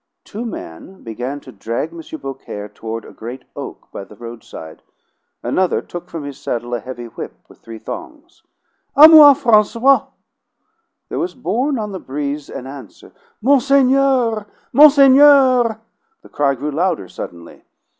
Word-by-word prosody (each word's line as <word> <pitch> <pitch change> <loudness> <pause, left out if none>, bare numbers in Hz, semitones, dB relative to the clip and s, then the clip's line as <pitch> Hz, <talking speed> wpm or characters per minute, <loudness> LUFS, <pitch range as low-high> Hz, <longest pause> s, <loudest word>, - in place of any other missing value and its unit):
Two 225 +4 -7
men 185 - -10
began 125 +5 -5
to - - -13
drag 115 +9 -4
M. 170 - -9 0.2
Beaucaire 135 -6 -8
toward 110 +2 -7
a - - -12
great 125 +3 -9
oak - - -9
by - - -7
the 100 +2 -15
roadside. 115 -8 -11 0.6
Another 185 -1 0
took 175 0 -9
from 165 -4 -7
his 140 -1 -8
saddle 120 -3 -4
a 120 - -1
heavy 120 +1 -8
whip 115 - -9
with - - -20
three 115 -1 -11
thongs. 335 - -10 0.5
"A 300 +2 +10
moi, 300 -3 +9
Francois!" 235 +2 +3 1.0
There - - -4
was 350 +2 -3
borne 255 +3 -1
on 210 -2 -4
the 190 - -6
breeze 145 +1 -5
an 125 - -8
answer 135 -5 -12 0.3
"Monseigneur! 265 -4 +2 0.3
Monseigneur!" 275 -5 +6 0.4
The - - -16
cry 140 -1 0
grew 145 +4 -4
louder 160 - -1
suddenly. 85 -1 -10
175 Hz, 145 wpm, -18 LUFS, -, 1.0 s, A